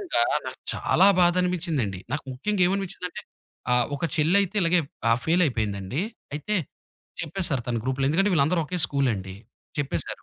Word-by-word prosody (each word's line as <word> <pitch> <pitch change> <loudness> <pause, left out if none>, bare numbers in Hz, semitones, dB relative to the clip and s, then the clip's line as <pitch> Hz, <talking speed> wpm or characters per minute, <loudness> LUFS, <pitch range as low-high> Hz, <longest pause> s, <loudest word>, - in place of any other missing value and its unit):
నిజంగా 380 -3 +1 0.2
నాకు - - -6 0.2
చాలా 190 - +3
బాధనిపించిందండి. 175 - +1
నాకు 150 0 -2
ముఖ్యంగా 185 +9 0
ఏమనిపించిందంటే, 190 -2 -4 0.5
ఆహ్, 125 -1 +3
ఒక 140 - -4
చెళ్ళైతే 185 +6 +2
ఇలాగే 170 +1 +4 0.3
ఆహ్, 115 - +4
ఫెయిలయిపోయిందండి 120 - 0 0.3
అయితే 210 +8 -1 0.7
చెప్పేసారు 165 -10 0
తన 120 - 0
గ్రూప్‌లో. 130 +1 0
ఎందుకంటే, 195 +5 +2
వీళ్ళందరూ 160 +3 +2
ఒకే 180 +4 -3
స్కూలండి 105 -9 -1 0.4
చెప్పేసారు. 145 -1 -3
160 Hz, 130 wpm, -25 LUFS, 130-180 Hz, 0.7 s, ఇలాగే